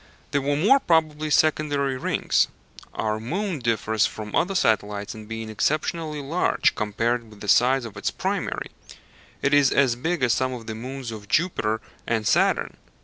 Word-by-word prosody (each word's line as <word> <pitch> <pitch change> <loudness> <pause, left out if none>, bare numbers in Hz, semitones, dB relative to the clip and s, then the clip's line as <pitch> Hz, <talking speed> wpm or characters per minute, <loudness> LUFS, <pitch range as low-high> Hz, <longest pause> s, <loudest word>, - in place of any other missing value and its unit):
They 140 - +2
were 140 +1 0
more 210 - +5
probably 155 - +1
secondary 145 -3 +2
rings. 130 - +1 0.4
Our 110 0 -2
moon 175 - -3
differs 110 -2 +1
from 105 -1 -8
other 195 +3 +1
satellites 105 - 0
in 110 -1 -10
being 115 0 -5
exceptionally 150 +6 -1
large 165 +6 +1
compared 115 +2 -1
with 105 -1 -15
the 105 - -8
size 125 +3 +4
of 110 -3 -9
its 100 - -1
primary; - - -3 0.7
it 140 - +2
is 145 -2 +6
as 130 -4 +3
big 160 +4 -2
as 120 -3 +4
some 130 +1 0
of 120 -2 -7
the 110 - -5
moons 125 +2 -6
of 105 -2 -9
Jupiter 110 -11 +1 0.3
and 110 -2 0
Saturn. - - +2
125 Hz, 165 wpm, -24 LUFS, 110-150 Hz, 0.7 s, is